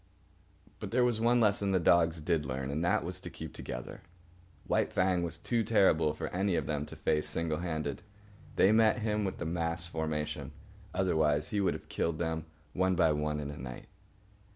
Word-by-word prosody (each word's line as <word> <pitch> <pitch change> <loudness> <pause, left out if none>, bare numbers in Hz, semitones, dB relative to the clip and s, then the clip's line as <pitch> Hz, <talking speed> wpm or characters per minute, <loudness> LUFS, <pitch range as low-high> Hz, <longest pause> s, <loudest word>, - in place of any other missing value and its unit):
But - - -5
there 125 +1 +3
was 120 -3 +1
one 120 +1 +4
lesson 100 -3 +2
the 95 - +4
dogs 85 -1 +3
did 80 -1 +1
learn, 65 0 -3
and 75 +4 -1
that 85 - +2
was - - -5
to - - -7
keep - - -8
together. - - -7 0.6
White - - +1
Fang 90 -1 +2
was 85 -1 -4
too 115 +7 0
terrible 95 -8 +4
for - - -4
any 95 0 0
of - - 0
them 75 -1 -2
to - - -9
face 75 -1 0
single 80 0 -1
handed. 80 -5 -3 0.5
They 95 - +5
met 110 +1 +5
him 105 -1 0
with 95 - -3
the 85 - -4
mass 85 0 -2
formation, 80 -2 -3 0.4
otherwise 80 -5 +1
he 105 - 0
would 95 -3 +1
have - - -10
killed 85 -1 -1
them, 80 -1 -2 0.3
one 95 0 +2
by 80 -3 +4
one, 75 0 -1
in 70 -1 -4
a 75 - -9
night. 65 -2 -8
85 Hz, 195 wpm, -31 LUFS, 75-95 Hz, 0.6 s, They